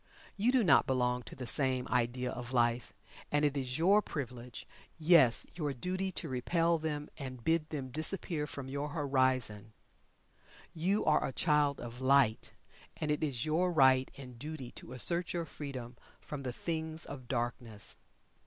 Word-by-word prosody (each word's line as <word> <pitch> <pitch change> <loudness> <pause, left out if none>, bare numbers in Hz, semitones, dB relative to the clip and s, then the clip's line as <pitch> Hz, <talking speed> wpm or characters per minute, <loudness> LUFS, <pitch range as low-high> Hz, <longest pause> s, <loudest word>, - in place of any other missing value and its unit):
You 220 +5 +2
do 255 -3 +3
not 145 -9 +5
belong 125 -1 +1
to - - -11
the 130 - -6
same 130 0 +1
idea 125 +1 0
of 125 +1 -7
life, 120 0 +1 0.4
and 145 0 +3
it 145 -1 +1
is 130 -2 -2
your 195 +6 +5
privilege 125 - -6 0.3
yes, 155 -7 +5
your 150 -5 -3
duty 185 +7 -2
to 170 - -3
repel 165 +6 +1
them 150 -2 -3
and 130 -3 -7
bid 160 +1 +1
them 135 -4 -4
disappear 155 +1 0
from 140 -2 -7
your 140 +2 -3
horizon. 130 -8 0 1.0
You 190 +6 0
are 155 - +4
a - - -2
Child 150 -1 +2
of 120 +1 -8
Light, 130 -4 +3 0.5
and 155 -1 -1
it 150 - -1
is 135 -6 -2
your 170 +4 +1
right 130 -4 +5
and 125 -4 -10
duty 150 -3 -6
to - - -10
assert 170 +7 +2
your 170 -1 -2
freedom 130 -6 -7 0.2
from 145 -2 -7
the 130 -2 -3
things 160 +1 -3
of 130 -3 -9
darkness. 120 -3 -3
140 Hz, 160 wpm, -33 LUFS, 125-160 Hz, 1.0 s, not